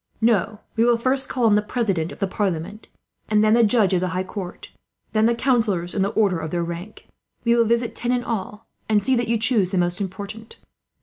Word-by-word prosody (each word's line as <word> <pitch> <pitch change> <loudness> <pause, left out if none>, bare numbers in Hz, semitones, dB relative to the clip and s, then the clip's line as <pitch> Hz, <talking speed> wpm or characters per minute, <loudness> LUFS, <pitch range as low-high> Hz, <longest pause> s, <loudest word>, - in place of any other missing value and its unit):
"No, 220 -1 +1
we 225 - +3
will 240 0 +4
first 260 +3 0
call 250 -2 0
on 220 - +5
the 210 - +4
President 200 -6 -1
of - - -10
the 195 - +1
Parliament, 190 +1 -3 0.4
and 215 0 +3
then 215 0 +4
the 235 0 +5
Judge 210 -3 +3
of 180 - +2
the 185 - 0
High 185 - 0
Court, 185 -1 -8 0.4
then 220 0 +3
the 235 - +2
councillors 220 -9 +1
in 200 - -1
the 195 - +2
order 195 -6 +1
of 160 -1 -4
their 170 +1 -1
rank. 170 +5 -7 0.4
We 235 0 +3
will 235 -1 +4
visit 235 +1 0
ten 240 +1 -2
in 245 -1 0
all, 210 -1 -5 0.2
and 210 -2 +3
see 260 +5 +2
that 240 -1 0
you 230 0 +1
choose 220 -4 +2
the 190 - -2
most 175 +1 0
important. 200 +4 -7
215 Hz, 230 wpm, -22 LUFS, 190-235 Hz, 0.4 s, on